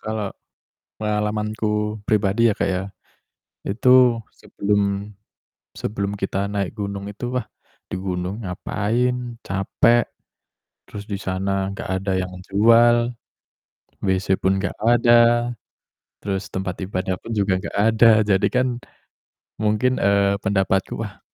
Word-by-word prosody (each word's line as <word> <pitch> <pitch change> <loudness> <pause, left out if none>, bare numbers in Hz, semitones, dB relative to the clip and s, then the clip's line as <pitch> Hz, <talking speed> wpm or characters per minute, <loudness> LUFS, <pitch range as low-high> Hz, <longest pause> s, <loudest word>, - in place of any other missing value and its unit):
kalau 110 -2 -4 0.7
pengalamanku 105 0 -1
pribadi 105 +2 +2
ya, - - 0
Kak, - - +1
ya, 95 0 -1 0.8
itu 125 +2 +4
sebelum 100 0 -1 0.7
sebelum 100 -1 -3
kita 100 +1 -2
naik 100 -1 -2
gunung 100 -1 -4
itu, 110 +4 -5
wah, 125 -3 -1 0.4
di - - -5
gunung 95 +3 -3
ngapain 120 +6 -2
capek, 115 +4 +2 0.9
terus 105 0 -8
di 100 - -3
sana 95 +1 -1
enggak 100 - -7 0.2
ada 95 -1 -1
yang 90 0 -4 0.2
jual, 120 +3 +4 0.9
WC 95 0 +1
pun 95 0 +1
enggak - - -3
ada, 120 0 +4 0.7
terus 100 -1 -3
tempat 95 -1 -3
ibadah 95 -1 -2
pun 115 - -7
juga 100 -3 +1
enggak - - -7
ada, 110 +2 +5
jadi 100 -2 +2
kan 125 0 +2 0.9
mungkin, 110 +4 +1
eee, 100 0 +3
pendapatku, 95 -1 0
wah, - - -6
105 Hz, 120 wpm, -22 LUFS, 95-115 Hz, 0.9 s, ada